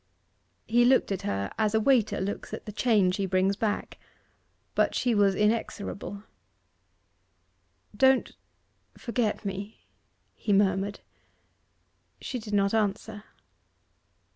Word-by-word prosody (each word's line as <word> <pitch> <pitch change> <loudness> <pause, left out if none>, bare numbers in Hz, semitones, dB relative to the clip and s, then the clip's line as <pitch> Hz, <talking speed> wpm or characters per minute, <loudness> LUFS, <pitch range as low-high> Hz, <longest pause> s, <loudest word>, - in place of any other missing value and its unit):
He 240 +2 +3
looked 255 -3 +3
at 195 - -2
her 100 0 -3
as 215 0 +1
a - - +4
waiter 235 -2 +2
looks 195 +2 -4
at - - -12
the 210 - -6
change 205 -4 +2
he 195 -1 -1
brings 190 +1 +1
back. 210 0 -3 0.7
But - - +1
she 245 -2 +1
was 200 -2 +3
inexorable. 210 -1 -2 1.7
'Don't 265 -1 +3 0.7
forget 235 -4 -2
me,' 200 +2 -5 0.6
he 205 - -1
murmured. 195 0 +1 1.2
She 255 - -5
did 215 -2 -4
not 200 0 +2
answer. 210 0 -1
205 Hz, 115 wpm, -27 LUFS, 195-225 Hz, 1.7 s, a